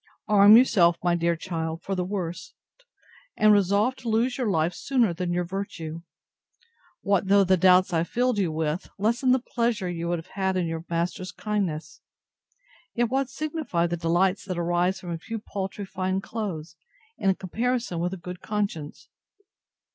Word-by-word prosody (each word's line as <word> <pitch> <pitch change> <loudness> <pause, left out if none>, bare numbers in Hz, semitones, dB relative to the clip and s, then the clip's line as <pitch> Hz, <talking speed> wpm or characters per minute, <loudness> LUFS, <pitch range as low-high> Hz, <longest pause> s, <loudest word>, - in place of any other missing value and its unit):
Arm 210 +1 +8
yourself, 180 -9 +4
my 175 -1 +2
dear 170 0 +1
child, 165 -1 -4
for 195 - -3
the 180 -1 -1
worst; 180 -3 -5 0.8
and 215 0 +6
resolve 205 +5 +2
to 240 - -5
lose 235 +3 +1
your 250 -5 -1
life 165 -1 +1
sooner 240 -3 +1
than 175 +1 -3
your 175 0 0
virtue. 170 -3 -5 1.0
What 200 -1 +1
though 200 0 +5
the 190 0 +4
doubts 185 +1 +4
I 165 0 +2
filled 245 +4 0
you 180 -5 +1
with, 155 +2 -2
lessen 235 +5 +1
the 255 - +5
pleasure 235 -5 -1
you 170 -1 -3
would 175 0 0
have 165 +2 -11
had 190 -1 0
in 180 - 0
your 165 0 -4
master's 175 +2 -2
kindness; 175 -8 -3 0.9
yet 240 0 +1
what 270 0 0
signify 290 - -2
the 175 0 -1
delights 175 +3 +1
that 185 -3 -4
arise 175 +2 +1
from 175 - -7
a 165 - -4
few 225 +6 -5
paltry 200 -1 -5
fine 190 0 -2
clothes, 195 -6 -5 0.4
in 195 -1 +2
comparison 230 0 -2
with 175 +1 -1
a 190 - -5
good 180 0 -8
conscience? 200 -8 -4
185 Hz, 170 wpm, -26 LUFS, 170-210 Hz, 1.0 s, Arm